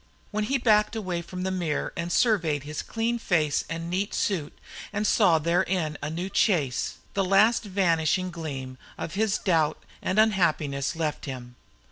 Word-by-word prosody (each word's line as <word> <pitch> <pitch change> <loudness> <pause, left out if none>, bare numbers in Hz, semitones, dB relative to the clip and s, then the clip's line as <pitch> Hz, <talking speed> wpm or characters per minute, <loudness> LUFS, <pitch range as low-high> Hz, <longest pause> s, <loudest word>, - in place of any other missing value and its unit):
When 210 0 -1
he 270 +5 +1
backed 215 -3 +3
away 185 -6 -2
from 180 +2 -6
the 190 - -1
mirror 175 -5 -2
and 170 +1 -3
surveyed 170 - +2
his 150 +1 -4
clean 235 +1 -2
face 155 -9 +1
and 165 +1 -4
neat 190 +4 -2
suit, 170 -8 -1 0.3
and 210 0 -1
saw 190 -7 +4
therein 170 0 0
a 150 - -3
new 170 +4 -3
Chase, 175 - +1 0.2
the 195 - +1
last 205 +5 +4
vanishing 185 -2 +1
gleam 135 -6 -6 0.2
of - - -5
his 215 +1 +1
doubt 160 -5 +1 0.2
and 185 - -1
unhappiness 165 -11 +2
left 160 -2 -2
him. 125 -3 -7
175 Hz, 160 wpm, -26 LUFS, 155-205 Hz, 0.3 s, saw